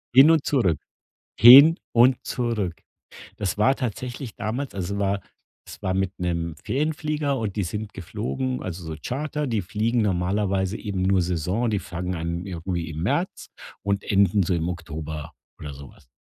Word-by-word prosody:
Hin 140 +5 +9
und 160 -3 +2
zurück, 105 - +2 0.6
hin 140 +9 +10 0.2
und 125 +2 +6
zurück. 110 -8 -2 0.6
Das 100 -3 -2
war 130 +6 +4
tatsächlich 125 0 -5
damals 120 +4 -3
es 100 +1 -3
war 100 0 0 0.5
es - - -11
war 95 -1 0
mit 95 0 0
'nem 85 -3 -2
Ferienflieger, 150 0 -1
und 110 -5 -3
die 105 - 0
sind 105 +4 -5
geflogen 95 - -4
also 90 -1 -6
so 80 -1 -5
Charter, 150 +3 -3
die 115 -6 -1
fliegen 110 +6 0
normalerweise 95 0 0
eben 100 -4 -4
nur 95 0 +3
Saison, 90 +7 -1
die 105 -2 0
fangen 90 -1 -4
an 85 +2 -3
irgendwie 85 -2 -4
im 80 +1 -5
März - - -1 0.4
und 100 0 -1
enden 100 0 +3
so 90 - 0
im 85 +1 -1
Oktober 80 -2 -6 0.3
oder 75 -1 -7
so 70 -1 -11
was. 70 - -22
100 Hz, 165 wpm, -24 LUFS, 85-120 Hz, 0.6 s, hin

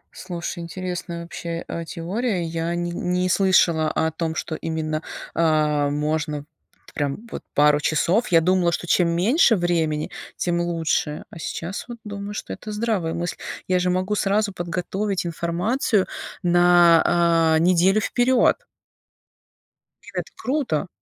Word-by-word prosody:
Слушай, 175 -1 -5
интересная 175 0 -5
вообще, 170 0 -5
э, 170 - -4
теория. 185 +4 -2
Я 165 +1 -2
не 175 0 -2
не 180 +1 -1
слышала 170 -4 +3
о 160 0 0
том, 160 0 -3
что 170 - -3
именно, 155 -1 -3 0.3
а, 150 -3 +2
можно 150 0 -1
т - - -26 0.5
прям 145 +10 -3
вот - - -5
пару 150 0 +5
часов. 170 +9 +1
Я 165 - +5
думала, 180 0 +2
что 175 - -3
чем 175 0 +3
меньше 225 - +4
времени, 165 -4 0 0.3
тем 175 -1 0
лучше. 165 -3 -1
А 165 - -10
сейчас 170 +4 -5
вот 240 -1 -7
думаю, 205 0 -6
что - - -5
это 215 - -8
здравая 210 -6 -1
мысль. 175 +1 -3 0.3
Я 185 -1 +2
же 180 0 +1
могу 185 +3 0
сразу 205 0 +1
подготовить 185 +3 -2
информацию 180 - 0 0.4
на, 170 -2 +5
э, - - +1
неделю 185 +3 +4
вперёд. 250 - +2 1.4
И - - -13
это - - -3
круто! 255 - -1
175 Hz, 140 wpm, -23 LUFS, 165-190 Hz, 1.4 s, пару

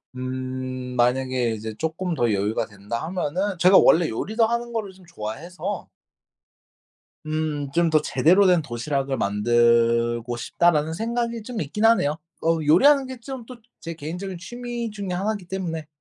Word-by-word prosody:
음 130 0 -5
만약에 125 -1 +1
이제 110 0 -5
쪼끔 165 +2 -2
더 120 -5 +1
여유가 100 +3 0
된다 105 +3 -6
하면은 185 +3 -2
제가 185 +2 +7
원래 165 0 +5
요리도 220 - 0
하는 235 +1 -2
거를 210 -4 -3
좀 185 -1 -19
좋아해서 165 +5 -6 1.4
음 155 -2 -2
'좀 170 +1 +3
더 155 -1 +4
제대로 180 +9 +4
된 175 -3 +4
도시락을 135 +2 -2
만들고 115 +2 +2
싶다.'라는 155 +5 +1
생각이 235 +3 -2
좀 235 -4 -5
있긴 160 +10 -2
하네요. 160 -9 +4 0.3
어 165 0 +3
요리하는 270 - +5
게 260 -1 -8
좀 255 -1 -7
또 255 - -10 0.2
제 165 0 -6
개인적인 175 +4 -6
취미 240 +2 -5
중에 200 -2 -6
하나기 200 +2 -2
때문에 170 -5 -4
160 Hz, 310 characters per minute, -24 LUFS, 130-200 Hz, 1.4 s, 제가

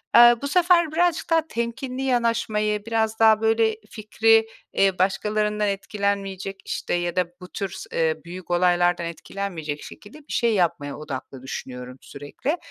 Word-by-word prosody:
Eee, 240 0 +9
bu 280 - -2
sefer 345 0 +4
birazcık 345 +1 +1
daha 325 -1 +2
temkinli 250 +1 -4
yanaşmayı, 225 -4 0
biraz 220 -1 0
daha, 220 -1 +6
böyle, 225 0 +2
fikri, 225 +1 +3 0.3
eee, 195 -2 +2
başkalarından 210 +2 +1
etkilenmeyecek, 195 -1 -2
işte, - - -3
ya 175 0 -1
da 180 - +2 0.2
bu 180 - -9
tür 195 -2 -3
s 185 - -9
eee, 160 -1 +1
büyük 175 +1 -8
olaylardan 175 -1 +2
etkilenmeyecek 165 -3 -5
şekilde 215 +8 -12
bir 300 - -10
şey 235 -2 +2
yapmaya 170 -7 0
odaklı 135 -3 -7
düşünüyorum 125 -1 -7
sürekli. 145 - -4
210 Hz, 145 wpm, -24 LUFS, 175-230 Hz, 0.3 s, Eee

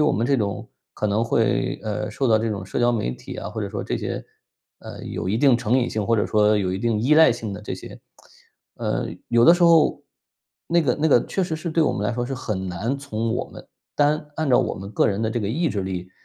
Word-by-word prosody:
我 150 - +3
们 115 - 0
这 140 +1 +3
种， 100 -4 -3 0.3
可 105 - -1
能 105 +2 +1
会， - - 0
呃， 105 0 -3
受 130 +3 -1
到 110 - +5
这 115 +1 -1
种 100 -3 -4
社 - - -3
交 120 0 +3
媒 105 - -1
体 60 0 -9
啊， - - -5
或 - - -5
者 - - -3
说 - - -4
这 - - -2
些， - - -4 0.6
呃， - - -10
有 - - -4
一 105 +4 0
定 135 -1 +5
成 120 +1 +1
瘾 125 - 0
性 110 -1 -2
或 115 - +3
者 105 - +1
说 105 0 +3
有 95 -2 -1
一 95 - -2
定 115 0 0
依 135 +7 +3
赖 160 -4 +7
性 115 -3 -5
的 105 +2 -8
这 - - -4
些 - - -11 0.8
呃， - - -2 0.2
有 120 0 +3
的 170 - +8
时 175 - -1
候， 165 -2 +4 0.6
那 170 0 +2
个 130 -5 +1
那 160 - +3
个 125 -5 +4
确 195 - -1
实 160 -3 -3
是 160 +2 -5
对 165 +1 +2
我 - - +2
们 105 - -2
来 120 - -1
说 120 +1 -2
是 135 - -3
很 105 -7 -4
难 110 +10 -2
从 115 -5 -3
我 - - -2
们 - - -13 0.3
单 150 +1 +1
按 155 -3 -1
照 125 - +5
我 - - 0
们 95 +2 -8
个 - - +2
人 100 +2 -1
的 110 - 0
这 120 - -2
个 100 - -2
意 160 +9 0
志 100 -4 -2
力， 90 -1 -5
115 Hz, 285 characters per minute, -23 LUFS, 105-140 Hz, 0.8 s, 的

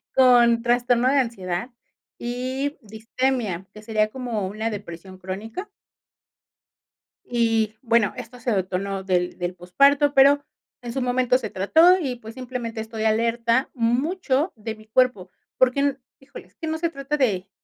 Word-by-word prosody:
con 240 -3 +5
trastorno 245 0 +2
de 280 - +2
ansiedad 225 -3 -3 0.5
y 260 +4 -3
distimia, 220 -2 -2
que 215 - -11
sería, 215 -1 0
como 235 -4 -3
una 215 +3 -3
depresión 190 -3 -8
crónica. 205 - -6 1.6
Y, 225 -3 +1
bueno, 230 -3 +2
esto 250 0 -9
se 245 0 -2
detonó 195 0 -2
del 180 -2 0
del 180 0 -3
posparto, 280 - +3
pero, 280 +1 +5 0.4
en 240 -1 -6
su 265 - -2
momento 250 0 +2
se 230 -4 -5
trató 320 - +5
y, 265 -7 -3
pues 225 -1 -11
simplemente, 245 -3 -5
estoy 220 0 -5
alerta, 230 +3 +1
mucho, 270 +6 0
de 220 +1 -5
mi 215 0 -17
cuerpo. 220 -6 +1 0.3
Porque, 255 +1 +3
n 280 -1 +1 0.2
Híjole, 275 +1 -12
es - - -31
que 325 - -6
no 315 0 -1
se 335 +1 -1
trata 285 -1 -3
de 200 -9 0
235 Hz, 150 wpm, -23 LUFS, 215-260 Hz, 1.6 s, con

